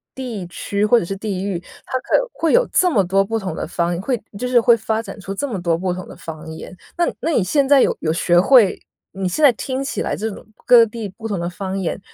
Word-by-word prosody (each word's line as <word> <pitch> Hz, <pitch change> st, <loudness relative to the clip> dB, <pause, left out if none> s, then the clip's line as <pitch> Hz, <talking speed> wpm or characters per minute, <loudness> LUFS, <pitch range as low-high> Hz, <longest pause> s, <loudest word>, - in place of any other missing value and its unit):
地 240 Hz, -8 st, -5 dB
区 200 Hz, +4 st, -2 dB
或 235 Hz, +2 st, +5 dB
者 -, -, -4 dB
是 195 Hz, -, -4 dB
地 195 Hz, -2 st, -4 dB
域。 195 Hz, -4 st, -2 dB, 0.3 s
它 255 Hz, -, -2 dB
可 -, -, 0 dB
以 -, -, +3 dB
会 325 Hz, -, 0 dB
有 -, -, +4 dB
这 365 Hz, -1 st, +3 dB
么 205 Hz, -10 st, +3 dB
多 195 Hz, +2 st, +2 dB
不 225 Hz, +2 st, -2 dB
同 185 Hz, -6 st, -5 dB
的 -, -, -4 dB
方 175 Hz, +1 st, -1 dB
会 245 Hz, +2 st, -2 dB, 0.2 s
就 250 Hz, -, -3 dB
是 245 Hz, -1 st, +5 dB
会 235 Hz, +1 st, +5 dB
发 220 Hz, 0 st, -2 dB
展 200 Hz, -4 st, -9 dB
出 195 Hz, 0 st, -6 dB
这 285 Hz, +9 st, -3 dB
么 205 Hz, -7 st, -4 dB
多 170 Hz, -2 st, +1 dB
不 180 Hz, +1 st, -2 dB
同 185 Hz, 0 st, -6 dB
的 -, -, -11 dB
方 160 Hz, 0 st, -9 dB
言。 160 Hz, +3 st, -9 dB, 0.2 s
那 345 Hz, -, +3 dB, 0.2 s
那 330 Hz, -, 0 dB
你 235 Hz, -, +2 dB
现 275 Hz, -, +1 dB
在 280 Hz, -1 st, +6 dB
有 -, -, +2 dB
有 155 Hz, -, 0 dB
学 175 Hz, +1 st, +3 dB
会 220 Hz, 0 st, +5 dB, 0.4 s
你 190 Hz, -1 st, -2 dB
现 185 Hz, -, -3 dB
在 285 Hz, -, +8 dB
听 260 Hz, +3 st, -4 dB
起 275 Hz, -, -3 dB
来 -, -, -1 dB
这 220 Hz, +2 st, -3 dB
种 200 Hz, -, -10 dB, 0.2 s
各 235 Hz, -2 st, +7 dB
地 220 Hz, -1 st, -6 dB
不 220 Hz, +4 st, -12 dB
同 200 Hz, -4 st, -2 dB
的 170 Hz, +1 st, -2 dB
方 195 Hz, +1 st, -4 dB
言 190 Hz, +1 st, -3 dB
200 Hz, 285 characters per minute, -20 LUFS, 185-245 Hz, 0.4 s, 在